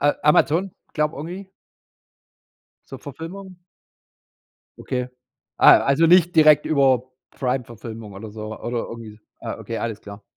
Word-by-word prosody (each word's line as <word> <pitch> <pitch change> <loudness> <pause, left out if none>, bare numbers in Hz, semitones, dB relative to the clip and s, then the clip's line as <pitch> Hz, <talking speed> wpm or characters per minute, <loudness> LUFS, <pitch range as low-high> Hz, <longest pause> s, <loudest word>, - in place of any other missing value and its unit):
A 145 +1 +2
Amazon, 165 +5 +3 0.2
glaube, 150 0 -1
irgendwie? 180 +6 -8 1.4
Zur 135 - -9
Verfilmung? 175 +6 -9 1.2
Okay. 125 -1 -3 0.5
Ah, - - +8
also 145 +4 +4
nicht 175 0 +4
direkt 155 -2 +6
über 135 -5 +3 0.3
Primeverfilmung 115 -4 -5
oder 105 +2 -9
so 110 0 -8
oder 120 0 -4
irgendwie. 110 -2 -10 0.2
Ah, - - -6
okay, 115 - -6
alles 115 -2 -4
klar. 100 0 -11
135 Hz, 120 wpm, -22 LUFS, 115-160 Hz, 1.4 s, Ah